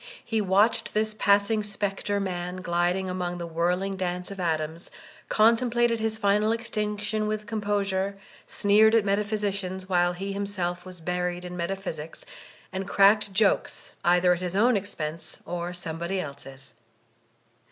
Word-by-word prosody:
He 225 -2 0
watched 205 +4 +2
this 215 0 +2
passing 205 +1 +3
spectre 205 0 -2
man, 180 -1 -4
gliding 175 +2 0
among 180 -1 -3
the 170 - -4
whirling 180 +4 -1
dance 180 0 -3
of 195 - -8
atoms, 160 -1 -2 0.4
contemplated 235 +1 +3
his 220 0 0
final 210 0 +2
extinc 210 -3 -3
tion 215 +1 -1
with 215 0 -2
composure, 200 -2 -1 0.3
sneered 215 +2 +4
at 220 -3 +3
metaphysicians 200 -2 -1
while 175 -1 +2
he 195 +2 -4
himself 185 -3 -3
was 180 -2 -10
buried 180 +1 -2
in 180 0 -6
metaphysics, 170 -3 -5 0.5
and 190 0 -3
cracked 200 +1 +4
jokes 200 0 +1
either 180 +1 +4
at 175 - -4
his 180 0 -3
own 235 +4 +4
expense 165 -5 -4
or 175 +1 -3
somebody 175 +1 -3
else's. 140 -3 -8
195 Hz, 140 wpm, -26 LUFS, 175-210 Hz, 0.5 s, sneered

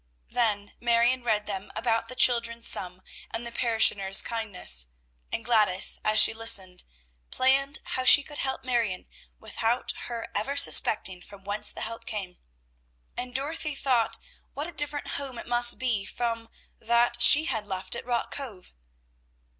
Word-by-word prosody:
Then 205 -4 -1
Marion 240 +1 +1
read 215 -3 -1
them 200 -1 -6
about 230 -2 -1
the 255 - -9
children's 235 -2 +2
sum, 180 0 -2 0.3
and 230 +1 -6
the 235 - -6
parishioners' 210 -5 +2
kindness; 190 - -3 0.4
and 230 - -4
Gladys, 210 -6 +1
as 215 0 +4
she - - +8
listened, 195 -5 -1 0.5
planned 275 +3 +1
how 255 - -4
she 285 +2 +7
could 295 +1 -11
help 265 -1 -4
Marion 230 -7 -2 0.3
without 230 +2 -2 0.2
her 235 -1 -6
ever 275 +7 -1
suspecting 190 -8 +3
from 200 +1 -15
whence 205 +1 +2
the - - -8
help 230 +1 -7
came, 195 -4 -7 0.8
and 250 0 -5
Dorothy 300 +2 -3
thought 255 -5 0 0.4
what 290 - -4
a 345 - -6
different 295 -2 -2
home 270 -3 -5
it - - -8
must 240 0 +5
be 235 -6 -2
from 230 +1 -4 0.3
that 235 +1 +1
she 295 +5 +9
had 220 -8 -3
left 190 +1 -3
at 235 - -7
Rock 240 -1 -3
Cove. 230 -10 -8
230 Hz, 155 wpm, -26 LUFS, 205-255 Hz, 0.8 s, she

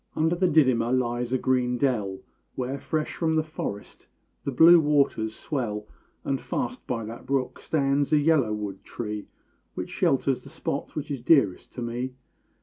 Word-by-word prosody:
_ - - -46 0.2
Under 160 +2 +3
the 185 +1 +2
Didima 130 -7 +3
lies 120 -1 0
a 130 - +3
green 125 -1 +1
dell, 110 -8 0 0.3
Where 130 +2 -3
fresh 155 +1 -2
from 160 -1 0
the 155 - +2
forest 155 -10 -6 0.4
the 140 - -1
blue 165 +6 +8
waters 140 -8 +1
swell; 110 -8 -3 0.4
And 135 -1 -1
fast 250 0 -4
by 115 -3 -2
that 115 +2 -9
brook 135 -2 -1
stands 140 -1 +1
a 155 - +5
yellow 145 -6 +3
wood 105 -2 -4
tree 105 -3 -5 0.5
Which - - -5
shelters - - +1
the - - -12
spot - - -4
which 150 -1 -4
is 135 -4 -3
dearest 120 - +3
to 125 - -5
me. 125 +2 -4
130 Hz, 170 wpm, -26 LUFS, 115-150 Hz, 0.5 s, blue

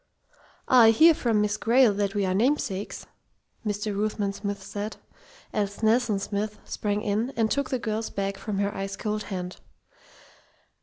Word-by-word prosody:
"I 240 -3 +7
hear 320 +9 +7
from 230 -7 +1
Miss 210 0 0
Grayle 235 -1 +4
that 200 0 -1
we 200 -1 +1
are 185 - 0
namesakes," 220 -2 -1 0.6
Mr. 210 -1 -2
Ruthven 205 -1 -1
Smith 200 -1 -4
said, 205 +2 -5 0.6
as 205 +1 -2
"Nelson 225 -1 +3
Smith" 205 +2 -3
sprang 210 0 -2
in 215 +4 0
and 225 -2 +1
took 280 -2 0
the 260 - 0
girl's 220 -1 -3
bag 195 0 -2
from 205 0 -4
her 200 0 -1
ice 195 0 -4
cold 210 +1 -3
hand. 180 -2 -5
210 Hz, 155 wpm, -26 LUFS, 200-225 Hz, 0.6 s, I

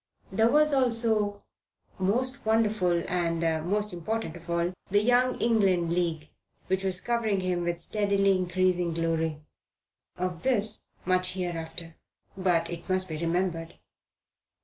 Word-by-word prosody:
There 225 0 +3
was 300 +2 +4
also, 230 -5 +1 0.6
most 250 +8 0
wonderful 215 -6 +2
and, 170 -2 0
important 180 +4 -1
thing 175 - -10
of 170 - -16
all, 170 +1 0 0.2
the 205 +2 +3
Young 250 +2 +3
England 190 -7 +2
League, 165 -3 -1 0.4
which 190 +1 -1
was 185 -1 +1
covering 225 -5 0
him 180 -1 -1
with 170 0 -2
steadily 200 +1 +2
increasing 180 -2 0
glory. 165 -2 -1 0.8
Of 180 -2 -3
this 220 -5 +1 0.2
much 185 0 +2
hereafter. 165 -2 -5 0.4
But 180 -3 +1
it 170 +2 -8
must 185 0 0
be 155 - -4
remembered. 170 0 -2
185 Hz, 125 wpm, -28 LUFS, 170-210 Hz, 0.8 s, was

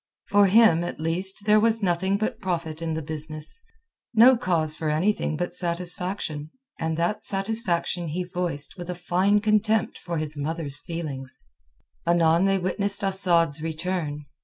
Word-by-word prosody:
For 200 0 +5
him, 195 -5 +5
at 175 - -6
least, 185 +5 -3
there 210 0 +5
was 225 0 +4
nothing 190 +2 +1
but 215 +1 -3
profit 165 -4 -3
in 165 -1 -2
the 160 - -4
business, 155 - -6 0.5
no 245 +4 +7
cause 165 -8 -1
for 155 -1 -3
anything 160 0 0
but 175 +2 -3
satisfaction; 175 -3 +1 0.3
and 160 -1 -2
that 170 +5 -1
satisfaction 195 -4 -1
he 170 +4 -3
voiced 175 -2 -2
with 175 0 -7
a 180 - -3
fine 185 +4 +1
contempt 215 +1 +1
for 170 -2 -5
his 155 -1 -3
mother's 145 -1 -2
feelings. 145 -6 -7 0.6
Anon 170 +1 +3
they 195 0 +2
witnessed 200 +2 +1
Asad's 170 -6 +3
return. 160 -2 -4
175 Hz, 150 wpm, -24 LUFS, 160-195 Hz, 0.6 s, no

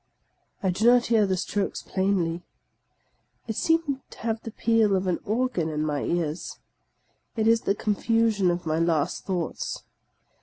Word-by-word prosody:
I 190 - +2
do 210 +6 +1
not 245 0 +6
hear 220 -3 +3
the 190 -1 0
strokes 200 +1 -2
plainly. 185 -3 0 1.1
I - - -2
seem 290 +2 +1
to - - -14
have 225 -1 -2
the - - -6
peal 220 -2 +2
of 190 0 0
an 180 -2 0
organ 215 -7 0
in 155 0 -2
my 150 -2 -1
ears. 170 -1 -2 0.8
It 220 -1 +1
is 230 0 +4
the 200 - 0
confusion 215 -2 +1
of 175 0 -2
my 160 0 0
last 165 -3 0
thoughts. 180 -4 -3
200 Hz, 155 wpm, -26 LUFS, 175-225 Hz, 1.1 s, not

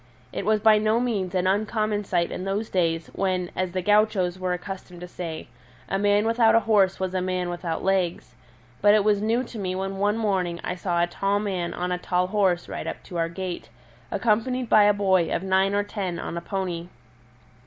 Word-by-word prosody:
It 200 - -4
was 215 0 +3
by 215 0 +5
no 215 +2 +2
means 200 -7 -1
an 180 0 +1
uncommon 210 +1 0
sight 175 -2 0
in - - -4
those 200 +3 -2
days 165 -3 0
when, 185 -2 -1
as 185 -1 -1
the 185 -1 -2
gauchos 205 -3 +2
were 185 -1 -1
accustomed 180 -1 -7
to 180 - -6
say, 170 -3 -6 0.4
a 195 - -1
man 205 +1 +3
without 225 0 +4
a 230 - +5
horse 200 -3 +3
was 190 -1 -2
a 185 - 0
man 180 -1 -2
without 175 -2 -4
legs; 185 -9 0 0.5
but 205 +1 +6
it 210 - +3
was 205 -1 +2
new 230 +4 +1
to 235 -3 -8
me 185 -2 -2
when 195 +1 -3
one 205 +2 +1
morning 185 -6 0
I - - -2
saw 175 -1 0
a - - +4
tall 195 +3 -1
man 185 -4 -3
on 180 +1 -2
a 180 - -1
tall 180 0 0
horse 185 -3 +1
ride - - -5
up - - -5
to 175 - -7
our 165 0 0
gate, 180 +1 -5 0.4
accompanied 240 +2 0
by 210 -1 +6
a 205 - +6
boy 190 -4 +2
of - - -1
nine 190 +1 +2
or 205 - +2
ten 195 -4 -4
on 170 - -5
a 170 - -3
pony. 175 -2 -3
190 Hz, 215 wpm, -25 LUFS, 180-210 Hz, 0.5 s, but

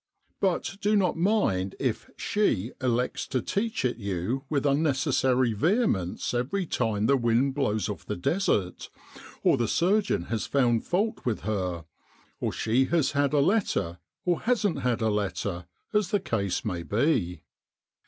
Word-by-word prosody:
But 190 0 0
do 210 +1 +2
not 185 -5 +2
mind 165 - +1
if - - -2
' - - -42
She 120 - +1
' - - -26
elects 125 -1 0
to 130 - 0
teach 210 - -1
it 125 - 0
you 100 +6 -3
with 145 -2 0
unnecessary 130 -4 +2
vehemence 125 - 0
every 135 +11 -1
time 110 -8 0
the 140 - +4
wind 120 +2 +2
blows 110 -7 0
off - - -6
the - - -2
Desert, 95 - 0 0.5
or - - +4
the 120 - 0
surgeon 190 - +2
has 110 +3 -3
found 120 -5 +2
fault 205 +5 0
with 120 -4 -1
her; 90 -5 -2 0.5
or - - -1
she 125 +4 +1
has 155 -2 +1
had 140 -1 +1
a 150 - +3
letter, 140 - +1 0.3
or 175 -2 +1
hasn't 220 -6 +1
had 125 -2 0
a 110 - +2
letter, 95 -3 -2 0.3
as 210 -4 +2
the 205 - +2
case 100 - -2
may 90 -5 -2
be. 105 - 0
130 Hz, 160 wpm, -27 LUFS, 105-175 Hz, 0.5 s, the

